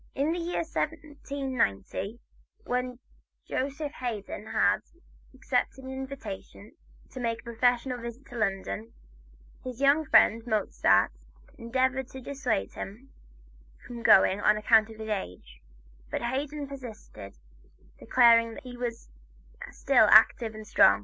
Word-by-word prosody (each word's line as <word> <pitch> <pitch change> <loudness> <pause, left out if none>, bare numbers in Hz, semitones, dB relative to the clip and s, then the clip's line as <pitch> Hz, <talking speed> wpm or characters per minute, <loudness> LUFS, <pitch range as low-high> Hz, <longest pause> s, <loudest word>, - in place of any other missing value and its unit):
In 280 +4 +1
the 345 - -2
year 340 0 -2
1790, 275 - -3 0.5
when 250 0 -2 0.5
Joseph 285 +2 -3
Haydn 220 -3 -5
had 205 -2 +2 0.5
accepted 260 0 -2
an 260 - -7
invitation 260 -6 -8 0.4
to 260 - -8
make 230 -2 -2
a - - -31
professional 245 +1 0
visit 235 +3 -8
to - - -9
London, 195 - -2 0.7
his 255 -1 -7
young 280 +3 +4
friend, 230 -3 +5
Mozart, 215 -3 +2 0.5
endeavored 260 +2 0
to 265 - -10
dissuade 265 - -2
him 235 +8 -9 0.7
from 240 -1 -8
going 195 -2 +5
on 210 0 +4
account 220 0 +4
of 220 - -11
his 220 0 -7
age, 90 - -6 0.5
but - - -3
Haydn 280 +4 -3
persisted, 225 - -10 0.6
declaring 230 -2 +4
that - - -10
he 250 -1 -9
was 240 -1 -5 0.6
still - - +3
active 225 -2 +5
and 215 0 -9
strong. 100 - +5
240 Hz, 125 wpm, -28 LUFS, 215-265 Hz, 0.7 s, friend